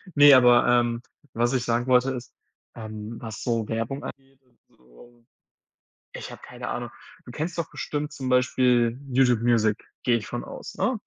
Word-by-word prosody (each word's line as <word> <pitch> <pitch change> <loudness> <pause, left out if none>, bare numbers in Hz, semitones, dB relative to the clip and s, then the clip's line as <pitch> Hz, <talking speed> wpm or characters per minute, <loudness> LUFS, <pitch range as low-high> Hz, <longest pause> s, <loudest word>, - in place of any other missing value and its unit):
Ne, 145 0 +8
aber, 125 -2 +6
ähm, 120 -1 +2 0.3
was 120 +3 +1
ich 125 -2 0
sagen 120 +1 0
wollte, 130 0 +3
ist, 125 -1 -7 0.4
ähm, 110 0 -7
was 110 -2 -7
so 115 -3 -1
Werbung 115 +5 -3
angeht 135 0 -11
und 125 -2 -35
so. 115 - -21 0.9
Ich - - -8
habe - - -11
keine 120 0 -7
Ahnung. 120 -1 -4 0.4
Du 120 - -10
kennst 160 +7 -4
doch 165 - -3
bestimmt 150 0 -4
zum 130 -3 -5
Beispiel 125 -1 +2
YouTube 125 -3 +3
Music, 115 -3 +2 0.3
gehe 120 -2 +3
ich 110 - -7
von 120 - -5
aus, - - -9
ne? 255 -2 0
120 Hz, 175 wpm, -25 LUFS, 115-130 Hz, 0.9 s, Ne